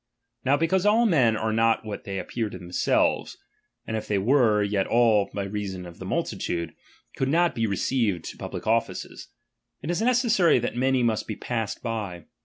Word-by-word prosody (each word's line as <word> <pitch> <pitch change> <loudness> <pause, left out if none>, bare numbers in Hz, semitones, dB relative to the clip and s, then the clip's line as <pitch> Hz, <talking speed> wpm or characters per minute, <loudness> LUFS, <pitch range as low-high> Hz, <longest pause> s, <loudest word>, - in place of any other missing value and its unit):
Now 135 +2 +3
because 165 +4 +1
all 215 +3 +4
men 130 - +3
are 110 0 -1
not 115 0 +2
what 105 -1 -6
they 100 -1 -4
appear 110 +3 -3
to 95 - -8
themselves; 90 0 0 0.5
and 110 - -3
if 110 - -4
they 105 - +1
were, 110 -1 +3
yet 100 -1 0
all 115 -4 +3
(by 100 - -3
reason 100 -2 -5
of 85 -1 -12
the - - -7
multitude) 85 -1 -2 0.4
could 135 - -1
not 170 +3 +3
be 115 -1 0
re 100 -2 -2
ceived 105 -10 0
to - - -8
public - - -6
offices; 115 +1 -1 0.6
it 155 - -2
is 175 - -1
necessary 235 - +3
that 120 -1 -2
many 130 0 +2
must 115 -2 0
be 110 - -4
passed 115 -2 -4
by. 105 -7 -4
115 Hz, 190 wpm, -25 LUFS, 100-135 Hz, 0.6 s, all